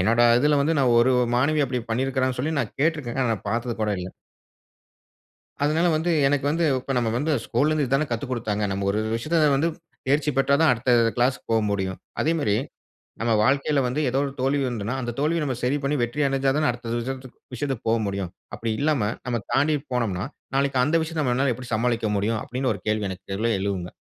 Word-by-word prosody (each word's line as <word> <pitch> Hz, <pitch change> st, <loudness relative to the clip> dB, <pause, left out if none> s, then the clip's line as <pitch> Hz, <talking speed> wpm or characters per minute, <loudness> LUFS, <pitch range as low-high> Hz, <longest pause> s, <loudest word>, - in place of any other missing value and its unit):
என்னொட 115 Hz, +5 st, +3 dB, 0.2 s
இதுல 145 Hz, +2 st, +3 dB
வந்து 155 Hz, +3 st, +1 dB
நான் 125 Hz, -3 st, +3 dB
ஒரு 130 Hz, +2 st, +4 dB, 0.2 s
மாணவி 145 Hz, +3 st, +2 dB
அப்டி 125 Hz, -1 st, -2 dB
பண்ணிருக்காங்கன்னு 130 Hz, +1 st, 0 dB
சொல்லி 160 Hz, +4 st, -1 dB
நான் -, -, -5 dB
கேட்ருக்கேன். 145 Hz, -5 st, 0 dB
ஆனா 125 Hz, -, +1 dB
நான் 105 Hz, -2 st, -6 dB
பார்த்தது 120 Hz, +2 st, -1 dB
கூட 105 Hz, -, 0 dB
இல்ல. 90 Hz, +1 st, -5 dB, 1.6 s
அதனால 160 Hz, +4 st, +2 dB
வந்து 170 Hz, +3 st, 0 dB, 0.2 s
எனக்கு 140 Hz, 0 st, +1 dB
வந்து 165 Hz, +2 st, +1 dB, 0.2 s
இப்ப 135 Hz, -, -4 dB
நம்ம 115 Hz, -2 st, 0 dB
வந்து 155 Hz, +4 st, -1 dB
ஸ்கூல்ல 135 Hz, +6 st, +1 dB
இருந்து 150 Hz, -3 st, +1 dB
இதான 135 Hz, +4 st, +1 dB
கத்துக்குடுத்தாங்க, 115 Hz, -4 st, -2 dB
நம்ம 100 Hz, 0 st, -2 dB
ஒரு 105 Hz, -, 0 dB, 0.2 s
விஷயத்துல 155 Hz, +5 st, +2 dB
வந்து 160 Hz, +4 st, +2 dB, 0.4 s
தேர்ச்சி 150 Hz, +2 st, +2 dB
பெற்றாதான், 140 Hz, +4 st, +4 dB
அடுத்த 125 Hz, +1 st, +1 dB, 0.2 s
கிளாஸ்க்கு 125 Hz, +2 st, +1 dB
போமுடியும். 100 Hz, -4 st, 0 dB, 0.2 s
அதேமாரி, 150 Hz, -10 st, +1 dB, 0.7 s
நம்ம 115 Hz, 0 st, +1 dB
வாழ்க்கைல 140 Hz, +2 st, +2 dB
வந்து 135 Hz, +5 st, -1 dB
ஏதோ 135 Hz, -, 0 dB
ஒரு 140 Hz, -, -4 dB
தோல்வி 140 Hz, +2 st, +1 dB
வந்ததுன்னா, 115 Hz, 0 st, -3 dB
அந்த 120 Hz, -1 st, -3 dB
தோல்விய 155 Hz, +2 st, +1 dB
நம்ம 130 Hz, -3 st, -1 dB
சரி 130 Hz, +4 st, +2 dB
பண்ணி 140 Hz, +2 st, +1 dB
வெற்றியடஞ்சா 135 Hz, +1 st, +1 dB
தான 155 Hz, 0 st, +2 dB
அடுத்த 120 Hz, -1 st, -6 dB
விஷயத்துக் 130 Hz, +1 st, -6 dB, 0.2 s
விஷயத்துக்கு 135 Hz, -3 st, -3 dB
போகமுடியும். 100 Hz, -5 st, -1 dB, 0.2 s
அப்டி 115 Hz, +1 st, -3 dB
இல்லாம 135 Hz, -8 st, +1 dB
நம்ம 120 Hz, -3 st, -1 dB
தாண்டி 145 Hz, +4 st, +3 dB, 0.2 s
போனோம்னா, 100 Hz, -6 st, -1 dB, 0.3 s
நாளைக்கு 135 Hz, -1 st, +1 dB
அந்த 150 Hz, +5 st, +1 dB
விஷயத்த 160 Hz, -1 st, -3 dB
நம்மளால 130 Hz, 0 st, +1 dB
எப்டி 125 Hz, -2 st, -7 dB
சமாளிக்க 115 Hz, -1 st, 0 dB
முடியும்? 110 Hz, +2 st, 0 dB
அப்டின்னு 130 Hz, 0 st, -1 dB
ஒரு 95 Hz, -, -9 dB
கேள்வி 105 Hz, -1 st, 0 dB
எனக்குள்ள 100 Hz, +4 st, -3 dB
எழும்ங்க. 95 Hz, -3 st, -3 dB
130 Hz, 180 wpm, -24 LUFS, 115-145 Hz, 1.6 s, ஒரு